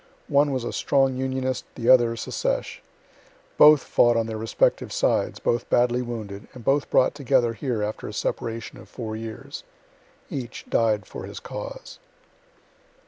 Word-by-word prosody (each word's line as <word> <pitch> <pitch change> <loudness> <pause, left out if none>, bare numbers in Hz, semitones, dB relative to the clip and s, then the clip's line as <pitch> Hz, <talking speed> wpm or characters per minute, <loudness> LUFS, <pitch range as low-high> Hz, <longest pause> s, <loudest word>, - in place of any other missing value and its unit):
One 145 +1 +4
was 130 -3 -2
a - - -4
strong 135 -2 +2
Unionist, 130 -1 -2
the 115 - -4
other 120 -2 +6
Secesh; 115 - -3 0.7
both 150 -1 +7
fought 120 -1 +3
on 115 - +1
their 110 -1 -5
respective 110 +1 +1
sides, - - +1
both 120 0 -1
badly 120 0 +3
wounded, 110 -5 -6
and 120 -3 -11
both 140 +1 +2
brought - - +3
together 120 -4 +1
here 115 -3 -2
after 105 +1 -4
a 105 - -7
separation 115 +2 -4
of - - -14
four 110 -3 -6
years. 110 0 -7 0.6
Each 125 -4 -6
died 110 -3 +1
for - - -8
his - - -8
cause. - - -8
120 Hz, 150 wpm, -24 LUFS, 115-130 Hz, 0.7 s, both